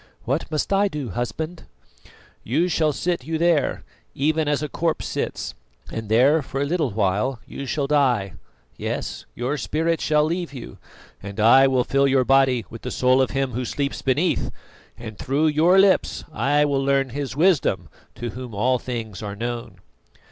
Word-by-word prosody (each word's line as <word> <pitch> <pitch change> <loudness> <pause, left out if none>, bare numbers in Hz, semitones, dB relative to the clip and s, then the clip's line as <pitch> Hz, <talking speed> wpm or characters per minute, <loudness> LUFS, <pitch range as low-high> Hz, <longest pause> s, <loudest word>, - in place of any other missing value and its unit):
"What 135 +6 -1
must 155 +5 -1
I 200 +1 +4
do, 145 - -5
husband?" 155 - -4 0.8
"You 160 +10 +1
shall 155 -2 +2
sit 170 0 -2
you 160 +3 -2
there, 165 -3 +1 0.3
even 155 +2 +1
as 145 0 0
a - - -1
corpse 160 +2 -1
sits, - - -3 0.4
and 110 -2 -5
there 135 +8 +4
for 135 0 -5
a 140 - +1
little 155 -2 0
while 105 +5 0
you 140 - -7
shall 145 +1 -1
die 130 - +2 0.4
yes, - - -4
your 130 +5 -2
spirit 160 +9 -1
shall 150 -1 +3
leave 170 0 -2
you 125 - -9 0.4
and 100 +1 -8
I 130 +5 +7
will 130 -2 +2
fill 140 +2 +2
your 130 -2 +3
body 135 -3 +3
with 115 - -10
the 125 - -5
soul 130 +1 +3
of 130 - +1
him 135 0 -1
who 125 +2 -3
sleeps 140 +3 -3
beneath; 145 +7 +1 0.5
and 110 -4 -9
through 140 +4 0
your 160 +5 +4
lips 195 0 +3
I 145 +1 +2
will 140 -2 0
learn 135 -1 +2
his 140 +1 -4
wisdom, 145 - +2 0.3
to 120 -1 -5
whom 125 -1 -8
all 125 +5 +2
things 115 -7 -5
are 100 -2 -5
known." 120 +2 -5
135 Hz, 175 wpm, -23 LUFS, 120-155 Hz, 0.8 s, I